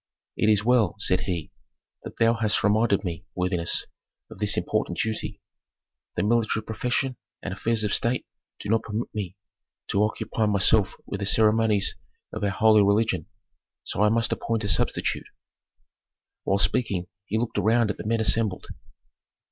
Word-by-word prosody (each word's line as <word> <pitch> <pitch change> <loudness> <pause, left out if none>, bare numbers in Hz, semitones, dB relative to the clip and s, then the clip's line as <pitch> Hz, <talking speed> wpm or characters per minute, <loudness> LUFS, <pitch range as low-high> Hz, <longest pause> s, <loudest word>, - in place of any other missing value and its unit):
"It 110 - +2
is 105 -1 +3
well," 115 -7 +3
said 90 -3 +3
he, 85 -5 -3 0.5
"that - - -9
thou 115 0 +4
hast 110 -2 0
reminded 105 -1 +2
me, 85 -2 -5
worthiness, 90 -2 +1 0.5
of - - -11
this - - 0
important - - -1
duty. 110 -1 -3 0.7
The - - 0
military 110 0 +1
profession 125 +3 -2 0.3
and - - -4
affairs 115 -1 0
of 105 - 0
state 120 +2 0 0.3
do - - -7
not 110 0 +3
permit 110 +2 -5
me 100 -3 -4 0.5
to 100 - +1
occupy 110 +1 -1
myself 100 0 +3
with 100 - -5
the 100 - -2
ceremonies 110 -1 +3 0.4
of 110 - -5
our 100 - +2
holy 110 +2 +4
religion, 100 -4 +1 0.6
so - - -3
I 105 - +5
must 115 +1 +1
appoint 115 -1 -1
a 100 - -2
substitute." 80 - 0 1.2
While 95 - +2
speaking 100 -4 0 0.2
he 110 - -1
looked 115 +1 -1
around 115 0 +2
at - - -8
the - - -6
men 115 0 +1
assembled. 105 -2 +1
105 Hz, 155 wpm, -25 LUFS, 100-115 Hz, 1.2 s, I